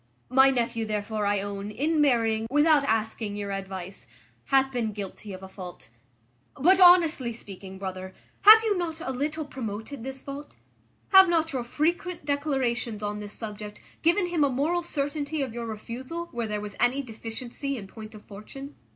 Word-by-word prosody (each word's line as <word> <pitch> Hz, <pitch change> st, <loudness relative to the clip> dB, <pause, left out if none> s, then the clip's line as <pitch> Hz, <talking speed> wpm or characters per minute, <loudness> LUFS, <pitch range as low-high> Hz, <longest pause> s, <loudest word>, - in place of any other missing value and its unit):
My 265 Hz, +2 st, +6 dB
nephew, 235 Hz, -3 st, -1 dB
therefore, 210 Hz, 0 st, -2 dB
I 205 Hz, -1 st, +1 dB
own, 200 Hz, 0 st, -5 dB
in 300 Hz, +8 st, +1 dB
marrying, 225 Hz, -5 st, +2 dB
without 295 Hz, +1 st, +4 dB
asking 220 Hz, -2 st, -1 dB
your 205 Hz, -1 st, -4 dB
advice, 190 Hz, -1 st, -6 dB, 0.4 s
hath 270 Hz, -1 st, +3 dB
been 230 Hz, -4 st, -2 dB
guilty 200 Hz, +1 st, -7 dB
of 190 Hz, 0 st, -8 dB
a -, -, -7 dB
fault. 185 Hz, -, -10 dB, 0.7 s
But, 360 Hz, +7 st, +4 dB
honestly 335 Hz, -9 st, +6 dB
speaking, 195 Hz, -3 st, -10 dB
brother, 190 Hz, -1 st, -6 dB, 0.3 s
have 440 Hz, +2 st, +10 dB
you 430 Hz, -2 st, +2 dB
not 330 Hz, -2 st, -3 dB
a 265 Hz, -, -3 dB
little 300 Hz, +4 st, -2 dB
promoted 230 Hz, -1 st, -6 dB
this 265 Hz, +1 st, -7 dB
fault? 285 Hz, +1 st, -8 dB, 0.5 s
Have 380 Hz, -2 st, +8 dB
not 325 Hz, -2 st, +1 dB
your 255 Hz, -2 st, -1 dB
frequent 335 Hz, +6 st, -1 dB
declarations 260 Hz, -6 st, -1 dB
on 210 Hz, 0 st, -3 dB
this 205 Hz, 0 st, -7 dB
subject 210 Hz, -1 st, -7 dB, 0.2 s
given 345 Hz, +3 st, +3 dB
him 335 Hz, -4 st, +2 dB
a 285 Hz, -, +3 dB
moral 300 Hz, +7 st, 0 dB
certainty 290 Hz, -2 st, -2 dB
of 255 Hz, -4 st, -5 dB
your 235 Hz, -1 st, -5 dB
refusal, 255 Hz, +10 st, -6 dB
where 235 Hz, -2 st, -3 dB
there 210 Hz, -1 st, -2 dB
was 205 Hz, -1 st, -7 dB
any 255 Hz, +3 st, +2 dB
deficiency 240 Hz, +4 st, -5 dB
in 205 Hz, -, -7 dB
point 215 Hz, +2 st, -11 dB
of 210 Hz, -, -12 dB
fortune? 270 Hz, +8 st, -10 dB
245 Hz, 170 wpm, -27 LUFS, 210-290 Hz, 0.7 s, have